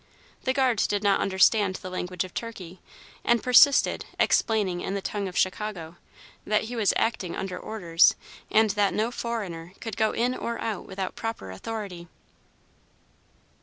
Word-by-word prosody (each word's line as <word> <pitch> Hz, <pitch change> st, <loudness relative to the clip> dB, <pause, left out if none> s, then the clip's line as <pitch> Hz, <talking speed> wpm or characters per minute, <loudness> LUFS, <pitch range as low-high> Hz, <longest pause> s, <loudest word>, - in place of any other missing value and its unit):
The 260 Hz, -, +2 dB
guard 260 Hz, -5 st, +2 dB
did 205 Hz, 0 st, -1 dB
not 200 Hz, -1 st, +3 dB
understand 195 Hz, 0 st, +3 dB
the 185 Hz, -, -7 dB
language 180 Hz, 0 st, -3 dB
of 185 Hz, -, -10 dB
Turkey, 190 Hz, -6 st, -7 dB, 0.4 s
and 235 Hz, -1 st, +2 dB
persisted, 255 Hz, +3 st, +5 dB
explaining, 200 Hz, -6 st, +2 dB
in 195 Hz, -, -3 dB
the -, -, -1 dB
tongue 205 Hz, -2 st, -3 dB
of 180 Hz, -, -6 dB
Chicago, 185 Hz, -4 st, -2 dB, 0.5 s
that 210 Hz, 0 st, +1 dB
he 235 Hz, +2 st, -6 dB
was 220 Hz, -4 st, +3 dB
acting 210 Hz, -6 st, -1 dB
under 185 Hz, -1 st, -4 dB
orders, 175 Hz, -6 st, +3 dB, 0.3 s
and 220 Hz, -1 st, +4 dB
that 205 Hz, -1 st, +1 dB
no 220 Hz, +3 st, 0 dB
"foreigner" 190 Hz, -9 st, -5 dB
could 225 Hz, -2 st, -6 dB
go 220 Hz, -1 st, +2 dB
in 245 Hz, +2 st, +1 dB
or 235 Hz, -2 st, -4 dB
out 220 Hz, -4 st, -4 dB
without 190 Hz, -1 st, -5 dB
proper 225 Hz, -, -5 dB
authority. 180 Hz, -, -6 dB
205 Hz, 155 wpm, -26 LUFS, 185-225 Hz, 0.5 s, persisted